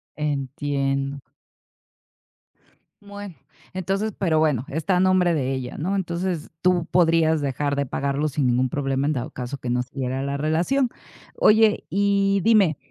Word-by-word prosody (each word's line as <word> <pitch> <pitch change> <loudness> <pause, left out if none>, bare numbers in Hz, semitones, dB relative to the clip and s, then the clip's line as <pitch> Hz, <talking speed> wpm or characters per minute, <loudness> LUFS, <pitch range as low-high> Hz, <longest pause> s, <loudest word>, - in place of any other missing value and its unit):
Entiendo. 140 -1 -2 1.8
Bueno, 200 -3 -9 0.4
entonces, 195 +4 -1
pero, 165 -5 +1
bueno, 145 -6 +1
está 160 +6 0
a - - +2
nombre 185 -2 +3
de 135 -3 -1
ella, 130 -2 -5
¿no? 185 +6 -1
Entonces, 175 -3 -2
tú 180 -2 +3
podrías 165 -3 +3
dejar 140 +1 -1
de 140 0 0
pagarlo 140 +3 -1
sin 145 -2 0
ningún 125 +1 +2
problema 135 0 -1
en 150 - +1
dado 125 -3 -3
caso 125 +2 -6
que 125 - -5
no 125 0 +1
siguiera 130 +1 -4
la 140 0 -2
relación. 170 - +1 0.5
Oye, 215 0 +4
y 200 0 +2
dime, 200 -9 +4
155 Hz, 145 wpm, -23 LUFS, 135-185 Hz, 1.8 s, Oye